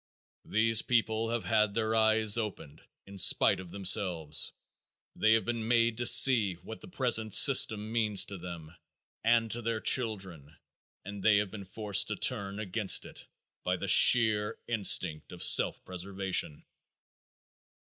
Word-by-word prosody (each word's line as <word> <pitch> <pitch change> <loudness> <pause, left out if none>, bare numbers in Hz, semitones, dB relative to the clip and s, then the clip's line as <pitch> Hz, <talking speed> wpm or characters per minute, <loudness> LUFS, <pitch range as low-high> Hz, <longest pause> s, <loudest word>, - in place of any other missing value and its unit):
These 110 +1 +1
people 115 -2 -2
have 120 -1 -4
had 105 -1 -1
their 110 -1 -3
eyes 110 -1 +2
opened 105 -10 -7 0.2
in 100 0 -10
spite - - +4
of 95 -2 -12
themselves. 90 -5 0 0.6
They 110 +1 +1
have 115 - -1
been 115 -2 -5
made 115 -1 0
to 120 0 -2
see 110 -9 +5
what 110 +6 -13
the - - -13
present 120 - 0
system 110 -6 +4
means 110 -4 +1
to 100 -2 -9
them 85 -2 -11 0.5
and 115 0 0
to 120 - 0
their 115 -1 -4
children, 95 - -2 0.5
and 100 0 -9
they 105 0 +2
have 100 -2 -3
been 100 -2 -10
forced 100 +1 -1
to 105 - -5
turn 100 -4 -2
against 105 0 -1
it - - -13 0.4
by - - -3
the - - -7
sheer 110 -3 +4
instinct 90 -8 0
of 90 - -7
self - - +3
preservation. 95 -4 -3
105 Hz, 150 wpm, -28 LUFS, 95-115 Hz, 0.6 s, see